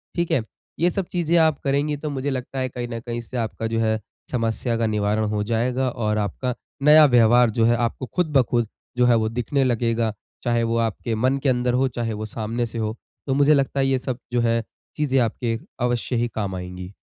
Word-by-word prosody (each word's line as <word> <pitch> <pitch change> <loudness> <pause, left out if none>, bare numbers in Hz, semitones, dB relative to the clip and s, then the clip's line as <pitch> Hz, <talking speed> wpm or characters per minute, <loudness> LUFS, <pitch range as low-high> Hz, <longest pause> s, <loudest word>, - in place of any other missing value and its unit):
ठीक 170 -1 -1
है? 120 - +2 0.4
ये 170 +2 +4
सब 195 +1 -2
चीज़ें 170 -1 +1
आप 160 -3 +4
करेंगी, 145 +2 +1
तो 150 +1 -4
मुझे 140 0 -2
लगता 130 0 -4
है, 130 - -1
कहीं 120 0 -5
न 115 - -3
कहीं 120 0 -5
इससे 120 +2 -7
आपका 115 -1 -2
जो 115 0 -1
है, 110 -1 +1 0.3
समस्या 115 0 -1
का 115 - +1
निवारण 105 0 0
हो 105 -1 -1
जाएगा 120 +4 0
और 110 -3 -1
आपका 115 +5 -2 0.3
नया 150 +1 +8
व्यवहार 120 -2 +5
जो 115 +1 +1
है, 120 +1 +4
आपको 120 +2 -2
खुद 180 -4 +1
ब - - +7
खुद 120 -2 +1 0.3
जो 125 - +4
है, 120 -1 +5
वो 110 -1 +1
दिखने 125 +4 0
लगेगा। 115 -2 +1 0.3
चाहे 120 -1 +1
वो 115 0 0
आपके 115 0 -1
मन 130 +5 +1
के 140 - +3
अंदर 125 -1 +1
हो, 130 +1 +2
चाहे 120 -2 -3
वो 110 +1 -4
सामने 115 +2 -3
से 115 0 -7
हो। 110 -1 -2 0.3
तो 135 - +1
मुझे 145 +2 +5
लगता 140 -1 +1
है, 135 - +3
ये 135 -1 +2
सब 130 -1 -4
जो 120 - +2
है, 115 0 +1 0.3
चीज़ें 140 -3 +1
आपके 115 -1 -1 0.2
अवश्य 120 +1 0
ही 120 0 +1
काम 100 -3 -2
आएँगी। 90 +1 -7
120 Hz, 225 wpm, -23 LUFS, 115-135 Hz, 0.4 s, नया